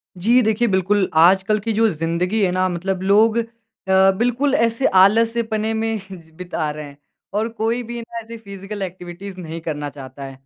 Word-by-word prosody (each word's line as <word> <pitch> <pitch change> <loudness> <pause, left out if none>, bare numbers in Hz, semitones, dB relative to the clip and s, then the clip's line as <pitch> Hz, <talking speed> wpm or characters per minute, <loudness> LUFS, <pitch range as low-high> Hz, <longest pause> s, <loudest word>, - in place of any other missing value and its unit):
जी 230 +8 +3
देखिए 220 +1 +1
बिल्कुल, 190 0 +1
आजकल 190 +6 +4
की 225 +2 -2
जो 225 +2 +3
ज़िंदगी 170 +5 -1
है 185 - +2
ना 185 +1 +1
मतलब 185 +1 -3
लोग 215 +4 +4
अ, 225 -5 +1
बिल्कुल 245 +7 0
ऐसे 230 0 +1 0.2
आलस्यपने 225 +1 +2
में 225 0 -1 0.4
बिता 175 -4 -3
रहे 150 0 -7
हैं। 140 -1 -13 0.4
और 215 +2 0
कोई 230 +1 -1
भी 240 +1 -6
ना 230 0 -7
ऐसी 230 +1 -10
फ़िज़िकल 200 -1 -8
एक्टिविटीज़ 185 +1 -7
नहीं 165 -1 -6
करना 150 -2 -4
चाहता 140 -1 -10
है। 135 - -7
200 Hz, 170 wpm, -20 LUFS, 180-225 Hz, 0.4 s, आजकल